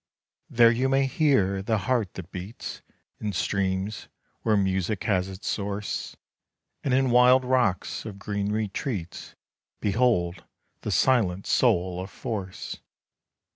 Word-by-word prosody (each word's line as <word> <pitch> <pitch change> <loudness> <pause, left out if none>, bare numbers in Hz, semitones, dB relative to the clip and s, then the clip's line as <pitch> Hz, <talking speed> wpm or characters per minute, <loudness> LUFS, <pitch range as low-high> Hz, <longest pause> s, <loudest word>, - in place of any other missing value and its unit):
There 115 -1 +6
you 125 +3 +1
may 135 0 +3
hear 130 - +2
the 110 +3 0
heart 110 -1 -1
that 95 0 -8
beats 95 +5 -7 0.4
In 105 -1 -3
streams, 95 +3 -1 0.3
where 110 -2 +2
music 95 +1 0
has 95 -4 +1
its 95 +1 -8
source; 100 0 -3 0.7
And 135 - 0
in 130 0 +3
wild 125 +1 +6
rocks 125 -7 +1
of 105 -3 -7
green 100 0 -2
retreats 105 - -4 0.4
Behold 100 -5 +1 0.4
the - - -4
silent 100 -8 +2
soul 90 0 +2
of 95 - -7
force. 100 -3 -5
105 Hz, 125 wpm, -26 LUFS, 95-120 Hz, 0.7 s, There